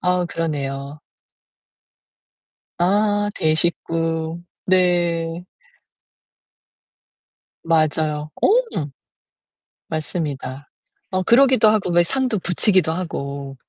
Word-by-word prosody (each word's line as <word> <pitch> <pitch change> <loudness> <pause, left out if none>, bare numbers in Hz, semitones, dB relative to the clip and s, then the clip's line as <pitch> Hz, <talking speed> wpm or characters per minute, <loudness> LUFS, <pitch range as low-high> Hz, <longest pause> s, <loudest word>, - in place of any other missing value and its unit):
아 180 0 +1
그러네요. 140 -3 -4 1.8
아 205 +3 +2
대식구. 165 +1 -1 0.2
네. 175 -2 +1 2.2
맞아요. 155 -2 +1
어. - - +5 1.4
맞습니다. 145 -4 -4 0.4
어 185 0 0
그러기도 255 -1 +5
하고 210 -4 +1
왜 175 0 +5
상도 255 +3 -1
붙이기도 180 -2 +2
하고. 140 -5 -5
165 Hz, 150 characters per minute, -21 LUFS, 155-185 Hz, 2.2 s, 어